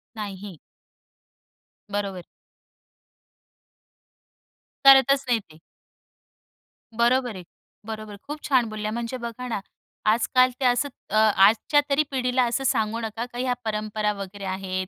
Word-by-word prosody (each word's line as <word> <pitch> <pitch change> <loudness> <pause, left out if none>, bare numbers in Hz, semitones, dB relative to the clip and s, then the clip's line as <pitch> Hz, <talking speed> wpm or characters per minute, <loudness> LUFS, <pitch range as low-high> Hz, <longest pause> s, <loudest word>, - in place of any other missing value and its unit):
नाही. 200 -4 -7 1.3
बरोबर. 200 -3 -3 2.6
करतच 275 0 +7
नाही 240 -2 +2
ते. 155 0 -17 1.4
बरोबर 240 -1 +2
आहे, 185 - -8 0.4
बरोबर 215 -1 -6
आहे. 205 - -9
खूप 295 +1 -5
छान 250 -5 +3
बोलल्या 215 0 -4
म्हणजे 235 +2 -4
बघा 235 +1 -6
ना, 230 - -2 0.5
आजकाल 255 +3 +3
ते 265 - -1
असं 245 +3 +2 0.2
अ, - - -3
आजच्या 215 +6 +4
तरी 285 +2 +3
पिढीला 255 -1 +1
असं 240 +3 -1
सांगू 220 -3 0
नका 225 +1 -4
का, 245 0 -11
ह्या 250 0 0
परंपरा 215 -1 -1
वगैरे 200 0 -8
आहेत, 185 0 -3
225 Hz, 120 wpm, -24 LUFS, 205-250 Hz, 2.6 s, करतच